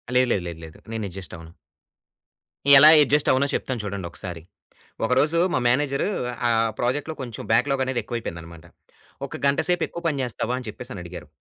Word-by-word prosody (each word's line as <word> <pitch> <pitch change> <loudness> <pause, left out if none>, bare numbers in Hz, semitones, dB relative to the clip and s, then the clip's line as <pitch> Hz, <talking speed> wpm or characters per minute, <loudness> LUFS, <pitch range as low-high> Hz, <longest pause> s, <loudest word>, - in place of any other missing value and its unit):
లేదు. 125 0 +4
లేదు. 95 - -1
లేదు. 85 -1 -7
లేదు. 80 - -13 0.2
నేను 110 -1 -3
ఎడ్జస్ట్ 95 +1 -9
అవ్వను. 80 0 -13 1.3
ఎలా 150 +3 +9 0.2
అడ్జస్ట్ 145 +1 +2
అవ్వనో 140 +2 +2
చెప్తాను 125 -4 -3
చూడండొకసారి. 90 -3 -5 0.6
ఒకరోజు 140 +7 +2
మా 130 - +2
మేనేజర్ 140 +2 +1 0.4
ఆహ్, 115 0 +2
ప్రాజెక్ట్‌లో 145 +6 -1
కొంచెం 120 -4 -7
బ్యాక్‌లాగనేది 130 +1 +1
ఎక్కువైపోయిందనమాట. 85 -8 -7 0.6
"ఒక - - -8
గంట 140 - +2
సేపు 180 - +2
ఎక్కువ 170 - -8
పని 140 -4 -1
జేస్తావా" 120 0 -2
అని 125 - -10
చెప్పేసని 105 -3 -8
అడిగారు. 85 0 -9
120 Hz, 155 wpm, -24 LUFS, 95-135 Hz, 1.3 s, ఎలా